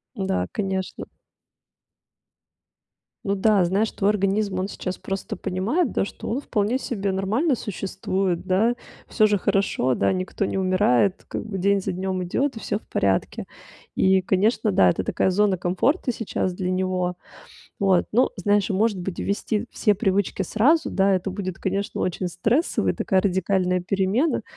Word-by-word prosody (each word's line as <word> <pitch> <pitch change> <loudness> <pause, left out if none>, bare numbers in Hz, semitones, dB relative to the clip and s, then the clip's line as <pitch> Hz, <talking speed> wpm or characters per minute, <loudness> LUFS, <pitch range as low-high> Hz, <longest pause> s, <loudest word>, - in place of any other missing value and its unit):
Да, 95 - -1
конечно. 190 -2 -3 2.2
Ну 200 - 0
да, 200 -1 +3
знаешь, 200 +5 0
твой 200 +1 +1
организм, 200 -1 0
он 190 - -2
сейчас 185 -1 -5
просто 195 -1 -5
понимает, 220 - -1
да, - - 0
что - - -7
он 250 - -1
вполне 220 -2 0
себе 200 -7 -2
нормально 220 - +1
существует, 190 -3 -2
да. 220 +6 +2 0.3
Всё 215 - +3
же 210 -1 +2
хорошо, 185 -10 +1
да, - - +1
никто 185 +2 -2
не - - -3
умирает, 185 -3 +2
как - - -4
бы 210 -3 -5
день 200 +1 +2
за 190 - -2
днем 185 0 -2
идет 265 +8 -1
и - - -6
всё 205 - -2
в - - -28
порядке. 95 -1 0 0.5
И, 190 0 +3
конечно, 205 +4 +1
да, 95 - +5
это 90 +1 0
такая - - +1
зона 200 0 +2
комфорта 185 - 0
сейчас 190 -5 -2
для 180 0 -2
него. 185 -1 -1 0.6
Вот, 190 -3 +3
ну, 245 +4 +3
знаешь, 205 +2 +1
и, - - +2
может 205 0 +1
быть, 180 0 -5
ввести 210 +2 -1
все 210 -3 +2
привычки 195 -1 0
сразу? 260 - +2
Да, 195 0 +2
это 190 +1 0
будет, 185 -3 -4
конечно, 195 +1 -2
очень 180 0 -1
стрессово, 225 - +1
и - - +1
такая 190 - +1
радикальная 185 -1 +1
перемена. 195 - 0
195 Hz, 160 wpm, -23 LUFS, 185-210 Hz, 2.2 s, да